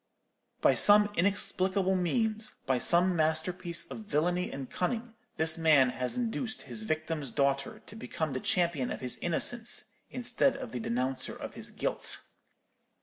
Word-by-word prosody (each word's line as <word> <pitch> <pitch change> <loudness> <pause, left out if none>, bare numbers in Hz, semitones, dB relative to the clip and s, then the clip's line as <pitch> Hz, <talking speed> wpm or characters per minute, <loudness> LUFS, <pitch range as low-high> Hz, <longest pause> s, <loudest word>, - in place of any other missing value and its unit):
By - - +5
some 205 0 +6
inexplicable 190 0 +1
means, 215 +4 0
by 130 -1 +1
some 175 +6 +3
masterpiece 170 +2 -1
of - - -8
villany 180 -2 0
and 135 -1 -6
cunning, 225 - -3 0.2
this 160 +1 +2
man 150 -5 +5
has 125 - -2
induced 235 -1 -1
his 220 - -4
victim's 155 -6 -2
daughter 140 +1 -1
to 210 - -12
become 160 -8 -3
the 130 - -2
champion 170 -5 0
of - - -5
his 125 -1 -5
innocence, 220 +5 -1 0.2
instead 255 +2 +1
of - - -7
the 125 - -4
denouncer 125 +3 -2
of - - -7
his - - -6
guilt. - - -1
175 Hz, 145 wpm, -30 LUFS, 145-210 Hz, 0.2 s, some